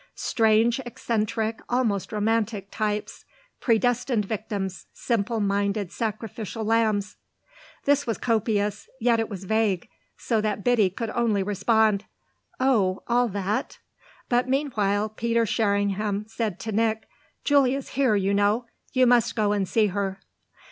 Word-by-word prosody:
"Strange 225 +2 +2
eccentric, 225 -2 -2
almost 230 -6 0
romantic, 215 -2 -1
types. 210 -1 -3 0.4
Predestined 240 -1 +1
victims, 200 -3 -4
simple 230 -1 -1
minded 200 -1 0
sacrificial 220 0 -4
lambs!" 215 -2 +1 0.7
This 285 -1 +2
was 225 - -1
copious, 210 -3 0
yet 235 -1 +3
it 225 - -1
was 195 -3 -6
vague, 210 -3 0 0.3
so 225 -3 0
that 210 -1 -2
Biddy 235 -6 +3
could 220 +4 -4
only 220 -5 +1
respond: 210 +1 +2 0.5
"Oh 215 -8 +2
all 245 +1 +2
that?" 200 0 -2 0.5
But 245 +1 +1
meanwhile 215 -7 +1
Peter 230 +2 0
Sherringham 205 -1 0
said 220 -4 -3
to 220 - -4
Nick: 220 +1 0 0.4
"Julia's 275 -2 +2
here, 260 -5 +2
you 200 0 +1
know. 205 +4 +2 0.3
You 255 -1 +4
must 240 -2 +3
go 210 -3 +2
and 200 -3 0
see 220 -2 +3
her." 195 -1 -2
220 Hz, 125 wpm, -25 LUFS, 205-235 Hz, 0.7 s, You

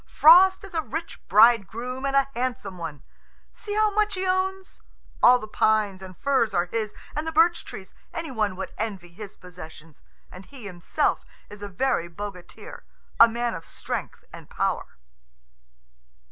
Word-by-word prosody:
"Frost 375 +5 +6
is 395 - -11
a 325 - 0
rich 315 +5 -6
bridegroom 235 +5 +3
and 275 - -1
a 275 0 +4
handsome 240 -7 -4
one. 155 -5 -7 0.5
See 415 -1 -6
how 430 0 +3
much 420 0 +1
he 375 0 -2
owns. 375 +1 -2 0.4
All 250 +1 +7
the 215 - -8
pines 210 -3 +1
and 185 -1 -11
firs 265 -6 +1
are 175 0 +2
his, 215 +3 -4 0.2
and 305 +2 -3
the - - -1
birch 330 +2 +3
trees. 190 - -10 0.2
Any 330 -3 -5
one 210 -5 -1
would 190 - -6
envy 200 -5 -4
his 200 +4 -11
possessions, 165 -3 -13 0.3
and 185 +1 -12
he 265 -6 -12
himself 180 -3 -1 0.3
is 205 0 -11
a 205 - -6
very 190 -4 -1
bogatir, 180 0 -9 0.4
a 230 - +9
man 235 +1 -2
of 165 - -7
strength - - -6
and - - -12
power." - - -2
225 Hz, 160 wpm, -25 LUFS, 190-310 Hz, 0.5 s, a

